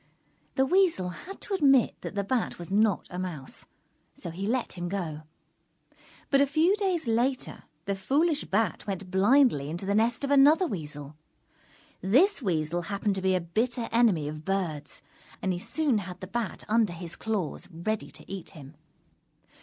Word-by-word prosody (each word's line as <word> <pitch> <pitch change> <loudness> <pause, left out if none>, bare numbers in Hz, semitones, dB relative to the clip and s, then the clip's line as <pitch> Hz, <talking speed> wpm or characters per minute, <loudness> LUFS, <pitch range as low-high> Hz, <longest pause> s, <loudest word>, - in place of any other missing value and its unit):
The 265 - +3
Weasel 340 - +3
had 360 - -9
to 410 - -5
admit 275 - +4
that - - -6
the 200 - 0
Bat 235 +3 -1
was 175 +1 -8
not 210 -1 +2
a 180 - -4
Mouse, 165 -8 -5 0.5
so 170 - -7
he 190 +4 -4
let 245 +2 -1
him 175 -1 -4
go. 170 -6 -3 1.1
But 275 -1 +5
a 280 - +4
few 320 +7 +3
days 370 -6 0
later, 240 +3 -1 0.2
the 200 - 0
foolish 290 - +1
Bat 210 -1 0
went 195 -2 -4
blindly 195 - +4
into 175 +4 -4
the 200 - 0
nest 230 +4 +2
of 280 - -1
another 290 +6 +6
Weasel. 150 - -6 0.9
This 280 - +4
Weasel 170 -4 0
happened 200 +3 -1
to 190 - -3
be 190 0 +2
a - - +2
bitter 230 +7 -1
enemy 220 -11 +3
of 155 +1 -6
Birds, 170 -7 -3 0.4
and 190 - 0
he 175 - -3
soon 280 - 0
had 180 -2 -7
the 185 - -6
Bat 225 +4 -4
under 220 -4 +2
his 170 0 -7
claws, 210 -8 -3
ready 200 +6 -3
to - - -13
eat 195 -3 -7
him. 140 0 -11
200 Hz, 170 wpm, -28 LUFS, 175-260 Hz, 1.1 s, another